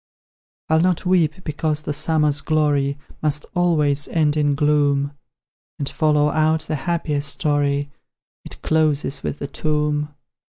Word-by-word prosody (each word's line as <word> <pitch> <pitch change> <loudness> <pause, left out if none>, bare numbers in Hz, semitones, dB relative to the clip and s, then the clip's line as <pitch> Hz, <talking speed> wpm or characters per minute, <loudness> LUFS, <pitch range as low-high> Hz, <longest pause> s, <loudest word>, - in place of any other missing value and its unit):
I'll 160 0 +3
not 180 +1 +1
weep, 180 -1 +1
because 155 0 -2
the 150 - -3
summer's 150 -1 +1
glory 145 -2 +1 0.2
Must 150 -1 -1
always 150 -5 +2
end 155 -3 +1
in 145 -2 +2
gloom; 145 -1 +2 0.7
And, 140 - -3
follow 150 -1 +2
out 155 +1 +2
the 155 0 -5 0.2
happiest 150 -4 -1
story 145 -1 0 0.5
It - - -11
closes 150 -3 +1
with 145 - -4
a - - -2
tomb! 150 0 -1
150 Hz, 130 wpm, -21 LUFS, 145-155 Hz, 0.7 s, I'll